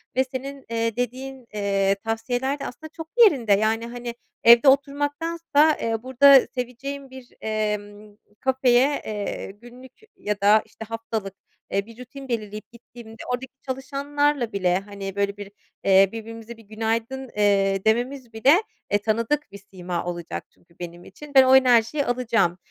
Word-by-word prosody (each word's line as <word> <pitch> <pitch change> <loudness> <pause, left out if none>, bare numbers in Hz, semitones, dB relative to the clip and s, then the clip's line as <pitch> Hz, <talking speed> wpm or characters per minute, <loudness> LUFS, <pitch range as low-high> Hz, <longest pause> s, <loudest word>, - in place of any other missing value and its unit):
ve 260 - +3
senin, 270 +1 -7
eee, 230 -1 -1
dediğin, 255 +2 -4
eee, 195 -1 +1
tavsiyeler 245 +5 -2
de - - -5
aslında 315 +6 -8
çok 325 -1 -8 0.2
yerinde; 255 - +4
yani, 220 +3 +1
hani, 240 0 -7 0.3
evde 235 +4 +7
oturmaktansa, 290 +3 +2
eee, 225 0 -2
burada 265 +1 +6
seveceğim 265 +3 -5
bir, 260 -1 -12
emm, 210 -1 -4 0.2
kafeye, 260 +1 +2
eee, 205 -2 -4
günlük 240 +5 -15 0.3
ya 210 -1 -3
da 210 +2 +5
işte 225 - -11
haftalık, 225 -3 -5 0.4
eee, 200 0 0
bir 230 0 -15
rutin 270 +2 -10
belirleyip 215 -3 -5
gittiğimde, 230 -1 -13
oradaki 255 +1 -4
çalışanlarla 275 -1 -1
bile, 185 -3 +1
hani, 195 -1 -8
böyle 200 0 -1
bir, 200 -1 -9 0.3
eee, 195 0 +5
birbirimizi 225 +1 -9
bir 225 - -16
günaydın, 230 +4 -3
eee, 195 -2 +2
dememiz 240 +2 0
bile, 255 +7 +5 0.4
eee, 205 - +4
tanıdık 225 +6 -1
bir 200 - -9
sima 180 -2 -4
olacak 175 -1 -5
çünkü 170 0 -29
benim 175 0 -8
için. 290 +9 -13
Ben 265 - +9
o 260 0 +6
enerjiyi 255 +2 +4
alacağım. 230 -7 +1
230 Hz, 150 wpm, -24 LUFS, 210-265 Hz, 0.4 s, Ben